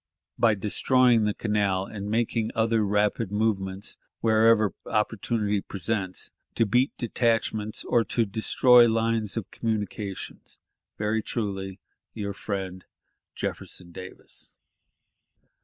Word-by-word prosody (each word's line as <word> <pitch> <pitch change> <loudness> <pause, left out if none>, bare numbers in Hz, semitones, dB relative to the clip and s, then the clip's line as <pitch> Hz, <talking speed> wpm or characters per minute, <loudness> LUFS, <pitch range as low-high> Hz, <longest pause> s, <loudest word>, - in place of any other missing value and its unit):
By 115 -2 +4
destroying 115 +3 +3
the 105 - +1
canal 100 -3 0
and 100 0 -6
making 115 0 0
other 115 -1 +2
rapid 105 +1 +1
movements 100 -2 -1 0.2
wherever 110 -1 +4
opportunity 105 -1 0
presents, 95 -1 -3 0.2
to 115 - +3
beat 125 +6 +2
detachments 115 -2 0
or 120 - +2
to 115 - +1
destroy 120 +3 +5
lines 115 -1 0
of 110 - -4
communication.... 105 -3 -4 0.6
"Very 110 +1 0
truly, 95 -4 -4 0.4
your 100 -2 -3
friend, 95 -2 -5 0.5
"Jefferson 85 -1 -4
Davis". 90 +1 -9
105 Hz, 105 wpm, -26 LUFS, 100-115 Hz, 0.6 s, destroy